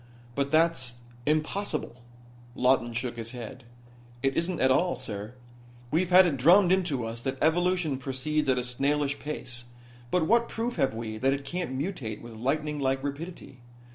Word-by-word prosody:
"But 140 +2 0
that's 160 -6 +2 0.3
impossible." 155 -4 -1 0.5
Lawton 125 -2 +3
shook 120 0 -3
his 115 +1 -6
head. 125 +1 -8 0.6
"It 135 -1 +1
isn't 170 0 0
at 130 - +4
all, 175 +6 +3
sir. 105 +3 -6 0.6
We've 175 +3 +2
had 185 +1 +8
it 155 -6 0
drummed 175 +7 +6
into 170 -10 +1
us 115 +1 -5
that 135 +2 -2
evolution 170 -3 +2
proceeds 135 +3 -1
at 130 - +3
a 125 - 0
snailish 140 +3 0
pace, 125 -5 -4 0.4
but 180 +1 +2
what 235 +5 +3
proof 235 +2 -3
have 135 -4 +1
we 110 -1 -5
that 135 +3 +3
it 140 0 -4
can't 170 -4 -3
mutate 135 - -3
with 120 -1 -10
lightning 150 +6 -1
like 135 -1 0
rapidity? 145 -2 -6
140 Hz, 165 wpm, -28 LUFS, 125-165 Hz, 0.6 s, had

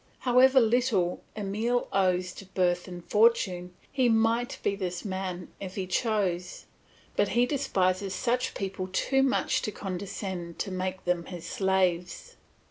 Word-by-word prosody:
However 260 +1 +6
little 225 -6 +2 0.2
Emile 220 +4 0
owes 185 -1 +1
to 195 - -10
birth 180 -1 0
and 175 -1 -8
fortune, 185 -5 +2 0.2
he 260 -3 +2
might 225 +2 +2
be 200 - +1
this 180 -2 -4
man 185 -2 -4
if 190 -1 -7
he 190 - -2
chose; 185 -3 -1 0.5
but - - +3
he 245 - +5
despises 195 -8 0
such 250 0 0
people 190 -1 -3
too 270 +8 +2
much 270 -1 +1
to 215 - -3
condescend 190 -3 -5
to 195 - -3
make 185 0 -3
them 175 -1 0
his 175 -2 -8
slaves. 185 -2 0
190 Hz, 140 wpm, -28 LUFS, 180-225 Hz, 0.5 s, However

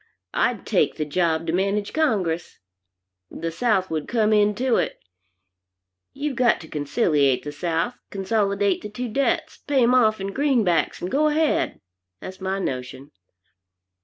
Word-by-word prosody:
I'd - - 0
take - - +1
the 155 - -2
job 165 +1 0
to 165 - -2
manage 200 +3 0
Congress. 195 - 0 0.7
The 165 +1 -4
South 195 -1 0
would 155 -2 -2
come 220 -2 +2
into 210 +4 +2
it. - - -1 1.1
You've 285 -1 -3
got 240 -1 +3
to 160 - -11
conciliate 145 - +1
the 145 - -5
South, 165 +9 -2
consolidate 200 -1 0
the 210 - -7
two 245 +4 -5
debts, 280 +8 0
pay 275 -3 +1
'em 240 +2 +4
off 220 -4 +4
in 195 0 -4
greenbacks, 245 - +1
and 180 - -3
go 300 +3 +3
ahead. 305 0 +1 0.4
That's 190 +1 -9
my 190 +1 -1
notion. 130 -4 -5
200 Hz, 145 wpm, -23 LUFS, 165-245 Hz, 1.1 s, em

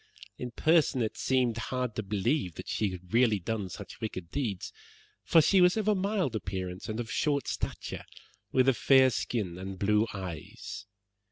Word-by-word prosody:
In 125 - -4
person 150 -1 +3
it 110 - -2
seemed 125 -3 +1
hard 125 -3 -2
to - - -1
believe 105 - -1
that - - -8
she 105 - 0
had 90 -1 -9
really 115 -3 +4
done 100 +1 -3
such 90 - -9
wicked 95 -6 -5
deeds, 110 -10 -3 0.5
for 165 - +5
she 190 +4 +5
was 180 +3 +5
of 215 -1 -1
a 210 - +5
mild 190 - 0
appearance, 95 -2 -4
and 110 +1 -3
of 115 -1 -4
short 145 -2 0
stature, - - -4 0.5
with 130 0 +3
a 135 - +6
fair 130 +1 +5
skin 95 -8 -2
and 95 0 -6
blue 105 +3 +2
eyes. 90 0 -7
115 Hz, 175 wpm, -30 LUFS, 95-135 Hz, 0.5 s, a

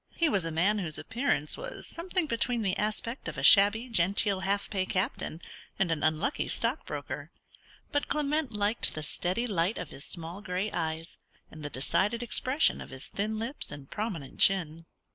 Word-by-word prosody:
He 335 -2 +3
was 195 - +1
a 165 - -2
man 190 +7 +2
whose 165 -6 -1
appearance 230 - 0
was - - -7
something 355 +1 0
between 235 -3 0
the 190 -2 +1
aspect 215 +4 -2
of - - -5
a - - -3
shabby 210 +4 +7
genteel 200 -2 +2
half 200 +1 0
pay 195 -3 -1
captain 185 - -2 0.3
and 190 -3 +1
an 160 -2 -1
unlucky 155 - 0
stockbroker: - - -3 0.6
but 290 - 0
Clement 300 -1 0
liked 210 +2 0
the 155 - -4
steady 180 +9 -1
light 195 -2 0
of 180 - -5
his 135 - -8
small 170 +3 -5
grey 185 +2 -2
eyes, 160 0 -3 0.3
and 155 - -10
the 145 - -3
decided 190 - 0
expression 255 +5 +1
of - - -9
his 130 0 -7
thin 215 +2 -2
lips 235 +6 -3
and 140 -1 -10
prominent 190 - -4
chin. 165 -4 +4
200 Hz, 175 wpm, -29 LUFS, 165-235 Hz, 0.6 s, shabby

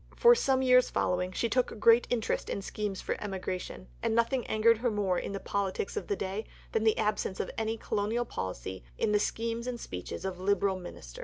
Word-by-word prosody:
For 475 0 +7
some 265 - +2
years 250 -1 +5
following, 180 0 0
she 230 - 0
took 245 -1 0
great 230 +2 +6
interest 235 -3 -1
in 200 - -3
schemes 205 -1 -3
for - - -2
emigration, 185 - -4 0.2
and 225 - +1
nothing 235 +2 +1
angered 220 +1 +4
her 240 +1 +1
more 200 -4 +1
in - - -4
the 195 - -3
politics 195 -1 -2
of - - -3
the 200 - 0
day 195 +3 -3 0.3
than 220 - +1
the 220 -1 +3
absence 210 -3 -1
of - - -2
any 225 0 -1
Colonial 220 +3 -1
Policy 95 - -5
in - - +1
the 210 - +4
schemes 230 +3 -2
and 245 -1 -3
speeches 90 - -6
of 185 -1 -3
Liberal 195 0 +1
Ministers. 60 - -9
210 Hz, 205 wpm, -30 LUFS, 190-230 Hz, 0.3 s, For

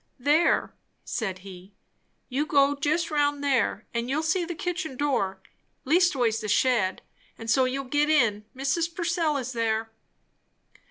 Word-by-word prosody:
"There!" 295 +6 +2 0.3
said 195 -6 -3
he, 190 +1 -12 0.5
"you 280 +4 -1
go 280 -1 +3
jist 310 +4 0
roun' 290 -1 +1
there, 260 -6 0
and 235 +1 -2
you'll 300 +4 0
see 320 +3 +1
the 345 0 -5
kitchen 340 -5 -4
door 195 -10 -1 0.4
leastways 265 -8 +2
the 215 - -4
shed; 210 -3 +1 0.3
and 225 0 -3
so 260 +2 +4
you'll 270 +2 -2
git 295 +3 +1
in. 225 -9 +2
Mrs. 325 +5 -1
Purcell 335 -4 0
is 260 -1 -4
there." 225 -1 -1
275 Hz, 145 wpm, -26 LUFS, 225-310 Hz, 0.5 s, so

